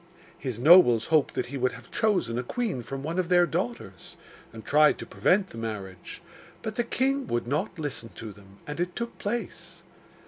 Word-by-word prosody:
His 130 -5 -5
nobles 125 -5 +7
hoped 155 -3 +3
that - - -1
he 135 +2 -6
would 130 0 +1
have - - -13
chosen 180 - +1
a - - -2
queen 210 - -2
from 135 +3 -6
one 165 +5 -2
of 180 -2 -1
their 175 -1 +5
daughters, 170 - -5 0.4
and 110 -1 -11
tried 150 +1 +5
to - - -7
prevent 190 +1 +1
the 115 - -8
marriage; 100 -5 -7 0.4
but 220 - -3
the 240 - 0
king 270 +3 0
would 120 0 -1
not 155 - -2
listen 145 -7 -4
to 110 -2 -8
them, 100 -1 -18
and 150 +2 -6
it 175 0 -2
took 235 0 -5
place. 235 +4 -5
150 Hz, 195 wpm, -27 LUFS, 115-190 Hz, 0.4 s, nobles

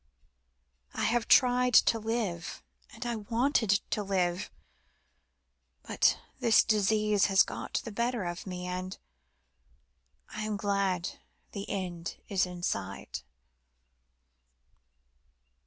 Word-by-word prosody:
I - - -1
have 235 0 +1
tried 250 -1 +5
to 225 - +6
live, 220 -6 -3 0.3
and - - -8
I 235 -1 -1
wanted 225 -2 +1
to 210 - 0
live, 185 -1 -1 1.3
but - - +2 0.2
the 235 -4 +5
disease 210 -1 +3
has 195 -1 +5
got - - -4
the 230 - -5
better 235 +1 -1
of 175 +2 -5
me, 180 -1 -5
and 185 +1 -4 1.3
I 215 - -6
am 215 -1 -2
glad 195 -3 -1 0.3
the 200 -1 -6
end 180 -3 -4
is 195 -2 +1
in 180 -1 -8
sight." - - -3
205 Hz, 105 wpm, -30 LUFS, 185-225 Hz, 1.3 s, to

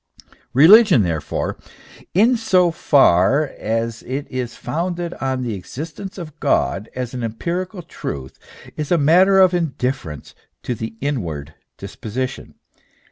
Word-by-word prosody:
Eeligion, 180 - +7
therefore, 80 -4 -3 0.6
in 230 +7 +5
so 185 -6 +3
far 135 - +4
as 115 +1 -2
it 135 +3 -4
is 125 -2 -4
founded 175 +1 -3
on 130 -1 -1
the 120 -3 -3
existence 155 - -7
of 155 -4 -9
God 105 +3 0
as 125 -1 -4
an 125 - -4
empirical 175 - -4
truth, 65 - -7 0.4
is 150 +1 -4
a 175 - +5
matter 180 +6 +5
of 185 -1 +6
indifference 130 - -3 0.3
to 125 - -2
the 110 0 -6
inward 85 - -3 0.2
disposition. 125 +4 -6
140 Hz, 125 wpm, -20 LUFS, 115-175 Hz, 0.6 s, Eeligion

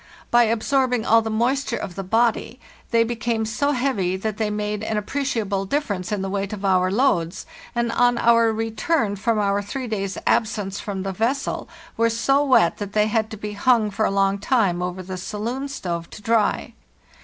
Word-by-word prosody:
By 240 0 +6
absorbing 245 +1 +1
all 225 +1 +5
the 220 - -4
moist 250 +6 0
ure 235 - -1
of 180 - -5
the 195 - -5
body 225 +4 +1 0.3
they 230 -1 +4
became 230 -1 -1
so 285 +7 0
heavy 240 -9 0
that 210 +2 -3
they 220 -2 0
made 210 0 -2
an 220 0 -2
appreciable 210 -4 -1
difference 200 -7 -2
in 205 -2 -1
the 195 - -3
weight 200 0 -2
of 200 -1 -5
our 185 -1 +3
loads, 185 -7 +1 0.3
and 235 -1 0
on 245 0 +3
our 230 -1 +4
return 225 +2 0
from 220 +3 0
our 200 -1 +1
three 255 +6 -5
days' 195 -3 -3
absence 210 -3 0
from 195 -2 -4
the 195 0 -3
vessel 240 +8 -1 0.3
were 230 +1 +3
so 270 +5 +2
wet 255 -12 +4
that 205 -1 -5
they 210 0 +3
had 220 0 0
to 220 - -7
be 210 0 -5
hung 215 0 +2
for 215 +2 -1
a - - +2
long 195 0 +1
time 200 -6 +1
over 180 +1 -4
the 185 0 -6
saloon 230 +8 -4
stove 175 -11 -4
to - - -11
dry. 225 -1 +1
220 Hz, 195 wpm, -22 LUFS, 195-235 Hz, 0.3 s, By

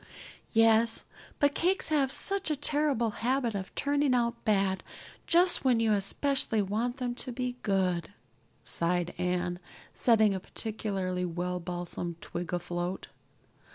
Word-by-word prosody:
"Yes; 225 0 +3 0.3
but 285 0 +3
cakes 365 +3 +1
have 280 -4 +2
such 390 +2 0
a 305 - +1
terrible 285 -5 +1
habit 250 -1 +1
of 190 -2 -5
turning 285 -2 +1
out 235 -1 +1
bad 195 -3 +1 0.5
just 350 +1 +5
when 250 -3 +3
you 225 -1 +3
especially 225 +4 +1
want 220 +6 -1
them 250 -2 -2
to 250 +1 -5
be 250 0 -3
good," 185 -4 0 0.5
sighed 175 +1 0
Anne, 180 0 -1 0.3
setting 220 -4 +4
a 190 - -2
particularly 190 -3 -3
well 180 +1 -2
balsamed 175 -1 -5
twig 175 +1 -6
afloat. 175 +1 -3
220 Hz, 130 wpm, -29 LUFS, 180-255 Hz, 0.5 s, just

